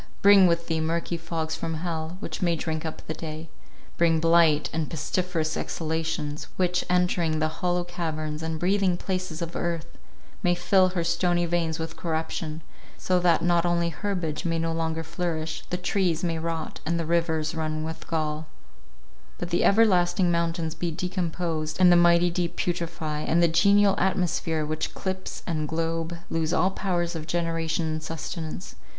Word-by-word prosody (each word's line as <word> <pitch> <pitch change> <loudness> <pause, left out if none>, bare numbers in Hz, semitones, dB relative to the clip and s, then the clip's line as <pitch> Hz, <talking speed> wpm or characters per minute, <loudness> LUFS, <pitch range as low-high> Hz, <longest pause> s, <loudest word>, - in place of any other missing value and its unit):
Bring 200 -2 +8
with 170 0 +1
thee 165 -1 -1
murky 165 +2 -1
fogs 165 -1 -3
from 165 0 -3
hell, 165 +1 -3
which - - -5
may 170 -2 +2
drink 160 0 -3
up 155 - -8
the 160 - -3
day; 160 0 -7 0.5
bring 165 -1 +4
blight 165 -2 +4
and 160 -1 -1
pestiferous 165 0 -1
exhalations, 160 -2 -3
which, 180 -1 +1
entering 180 -3 +2
the 155 0 -1
hollow 180 0 +1
caverns 155 -3 -4
and 160 0 -3
breathing 185 0 +2
places 185 -3 -3
of 170 0 -6
earth, 170 -2 -3 0.4
may 175 -3 +3
fill 185 +1 +4
her 180 -2 -1
stony 175 +1 +1
veins 165 -2 0
with 160 0 -5
corruption, 160 -1 -3 0.3
so 185 -1 +1
that 175 -2 +3
not 175 -1 +3
only 170 -1 +1
herbage 170 -3 -3
may 165 -1 0
no 165 0 0
longer 165 0 -1
flourish, 165 -1 -3
the 180 - -1
trees 180 -2 0
may 165 -2 0
rot, 165 -1 -4
and 170 +2 0
the 165 - -1
rivers 160 -1 0
run 155 -1 -2
with 160 0 -6
gall—but 150 - -7
the 170 - +2
everlasting 185 -4 +4
mountains 170 -1 0
be 170 +1 -2
decomposed, 165 -2 -2
and 180 -1 +7
the - - +7
mighty 175 0 +5
deep 175 -1 -2
putrify, 170 -3 -2
and 165 +3 +2
the - - +6
genial 200 +4 +5
atmosphere 175 -4 0
which 155 +1 -3
clips 190 0 -4
the 155 -3 -2
globe, 165 +1 -2
lose 160 -1 0
all 185 - +3
powers 175 -3 -1
of 160 -1 -5
generation 165 -1 -1
and 155 0 -2
sustenance. 160 +2 -5
165 Hz, 165 wpm, -26 LUFS, 160-175 Hz, 0.5 s, Bring